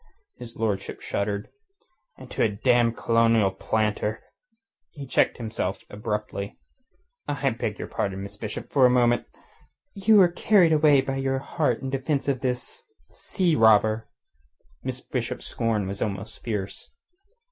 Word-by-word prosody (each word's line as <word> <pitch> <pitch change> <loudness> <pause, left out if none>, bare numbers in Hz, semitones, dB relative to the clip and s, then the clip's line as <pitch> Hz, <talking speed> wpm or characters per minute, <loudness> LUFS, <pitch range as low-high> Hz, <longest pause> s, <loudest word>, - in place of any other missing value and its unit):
Ugh!" - - -33 0.2
His 120 -1 -8
lordship 105 -3 -2
shuddered. 100 0 -2 0.7
"And - - -12
to - - -2
a 110 - +4
damned 115 +2 +2
colonial 115 -3 +3
planter!" 110 +1 -1 0.7
He 145 -2 -9
checked 130 - +1 0.5
abruptly. 105 -1 -4 0.7
"I - - 0
beg - - -3
your - - -5
pardon, 95 -1 -3
Miss 100 - -8
Bishop. 110 -2 -6
For 140 - +2
the - - +7
moment...." 120 -1 +3 0.7
"You 215 +2 +3
were 190 -4 +7
carried 175 -3 +4
away 150 -3 +5
by 135 0 -3
your 135 0 0
heat 135 -2 -1
in 135 - -3
defence 135 +1 -1
of 135 -2 +1
this... 125 -2 -3 0.3
sea 175 -4 0
robber." 110 0 +4 0.7
Miss 130 -1 -4
Bishop's 125 -2 -4
scorn 115 -4 -1
was 100 +1 -5
almost 105 +1 -4
fierce. 105 -4 -5
115 Hz, 140 wpm, -25 LUFS, 105-135 Hz, 0.7 s, the